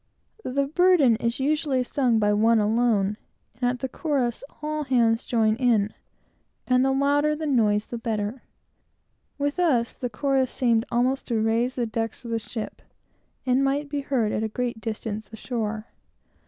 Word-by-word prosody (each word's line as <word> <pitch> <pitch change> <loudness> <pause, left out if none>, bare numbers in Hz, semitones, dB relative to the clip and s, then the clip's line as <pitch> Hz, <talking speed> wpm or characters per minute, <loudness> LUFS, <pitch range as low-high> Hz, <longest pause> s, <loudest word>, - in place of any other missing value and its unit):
The 275 +2 0
burden 315 -5 +4
is 235 +1 -2
usually 285 -2 +1
sung, 245 -2 +1
by 210 -1 +2
one 225 +2 +4
alone, 210 -2 +2 0.4
and, 245 +2 0
at 245 -1 -4
the 265 - -1
chorus, 260 -4 -1 0.2
all 305 0 -2
hands 235 -3 +2
join 220 -2 +2
in, 225 -5 +2 0.7
and 255 0 +3
the 270 - +2
louder 285 +2 +2
the 315 +1 -4
noise, 215 -7 +2
the 235 - -6
better. 220 +1 -3 1.0
With 285 +3 -1
us, 255 -10 +2
the 250 - -4
chorus 265 +2 0
seemed 235 -2 +1
almost 255 +3 +1
to 230 -3 0
raise 230 +3 +1
the 245 - 0
decks 225 +2 -4
of 235 - -5
the 230 - 0
ship, 220 0 -6 0.6
and 260 +1 +2
might 280 +2 0
be 285 0 -2
heard 250 -6 0
at - - -1
a 220 - 0
great 235 0 -3
distance, 220 -1 -5
ashore. 220 -1 -4
245 Hz, 165 wpm, -25 LUFS, 225-270 Hz, 1.0 s, burden